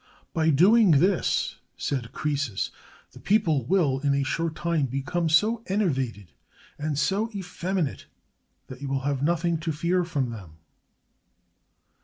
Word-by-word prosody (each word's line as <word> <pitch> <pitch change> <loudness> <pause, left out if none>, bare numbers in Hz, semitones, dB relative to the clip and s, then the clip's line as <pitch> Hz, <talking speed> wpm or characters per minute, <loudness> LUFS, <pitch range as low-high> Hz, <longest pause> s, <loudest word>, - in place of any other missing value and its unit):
"By 160 -2 +2
doing 195 +8 +5
this," 185 +2 +1 0.2
said 125 -5 -3
Croesus, 140 -9 -2 0.4
"the - - -14
people 165 - +2
will, 145 -5 +2
in 140 0 +1
a 140 - +1
short 160 +4 -2
time, 165 -5 0
become 145 +6 -1
so 215 +8 +3
enervated 135 - -1 0.5
and 150 -1 -2
so 195 +10 +1
effeminate 185 -4 -3 0.6
that 130 +1 -11
you 140 - -4
will 135 0 -1
have 140 -1 -1
nothing 170 +2 +1
to 160 +1 -2
fear 170 +4 0
from 145 -8 -2
them." 90 -8 -10
155 Hz, 135 wpm, -26 LUFS, 135-180 Hz, 0.6 s, doing